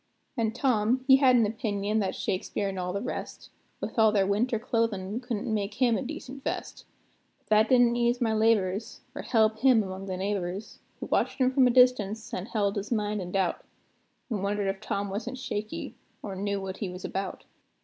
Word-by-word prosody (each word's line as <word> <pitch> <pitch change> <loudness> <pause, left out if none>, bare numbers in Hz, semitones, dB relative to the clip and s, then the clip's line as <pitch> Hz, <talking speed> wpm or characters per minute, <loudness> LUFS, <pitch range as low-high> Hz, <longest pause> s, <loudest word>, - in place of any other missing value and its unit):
An' 225 -4 0
Tom, 250 -1 +1
he 265 -1 +8
had 260 -2 +5
an 235 -3 +5
opinion 210 -1 -1
that 195 -3 -1
Shakspeare 195 +2 -2
an' 190 -1 -5
all 180 0 -2
the 200 +2 -3
rest, - - -6 0.3
With - - -4
all 220 -1 +6
their 200 -2 +3
winter 225 +5 +1
clothin', 220 -2 -1
couldn't 235 -3 -3
make 205 0 -2
him 245 -2 +3
a - - -1
decent 270 -1 -7
vest; - - -4 0.5
But - - -37
that 215 +1 +4
didn't 245 -2 +5
ease 240 0 +1
my 225 -3 +1
labors, 215 -1 +1
or 290 - -5
help 220 -2 +2
him 250 -4 +5
among 190 0 -6
the 185 -1 -3
neighbors, 195 0 -3 0.2
Who - - -3
watched - - 0
him 255 -2 +3
from 260 -1 +5
a - - +3
distance, 230 -3 +3
an' 185 0 -3
held 205 -2 0
his 200 +3 -4
mind 210 -2 0
in 180 -1 -6
doubt, 190 -2 0 0.7
An' 210 -4 -1
wondered 200 0 0
if 195 +1 -4
Tom 200 -2 -3
wasn't 235 +6 -4
shaky, 215 -4 -4 0.3
or 195 -2 -5
knew 200 +1 -2
what 190 0 -5
he 200 - -3
was 180 +1 -7
about. 195 0 -4
215 Hz, 200 wpm, -28 LUFS, 200-240 Hz, 0.7 s, he